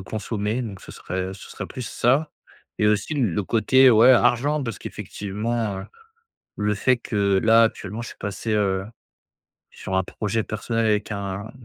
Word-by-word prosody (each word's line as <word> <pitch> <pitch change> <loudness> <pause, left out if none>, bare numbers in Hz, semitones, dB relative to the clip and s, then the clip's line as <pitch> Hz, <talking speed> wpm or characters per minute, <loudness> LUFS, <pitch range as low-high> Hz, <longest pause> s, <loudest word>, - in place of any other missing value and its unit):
consommer, 105 +3 -3
donc 100 -5 -7
ce - - -11
serait, 90 +2 -5
heu, - - -6
ce - - -12
serait - - -6
plus 130 - -7
ça. 140 +6 +1 0.5
Et 105 - +3
aussi 105 +9 +1
le 105 - 0
côté 130 +6 +5
ouais, 115 +3 +7
argent 130 +4 +3
parce 115 -4 -4
qu'effectivement, 105 0 -4
heu, - - -8 0.7
le 105 0 0
fait 125 +5 +2
que 100 -5 0
là 115 0 +6
actuellement 110 0 -3
je - - -7
suis - - -11
passé, 105 +2 -4
heu, 95 -2 +1 0.9
sur 95 - -4
un 95 - +3
projet 110 +4 -2
personnel 115 +2 -2
avec 105 0 0
un 100 +1 -5
110 Hz, 170 wpm, -23 LUFS, 100-120 Hz, 0.9 s, ouais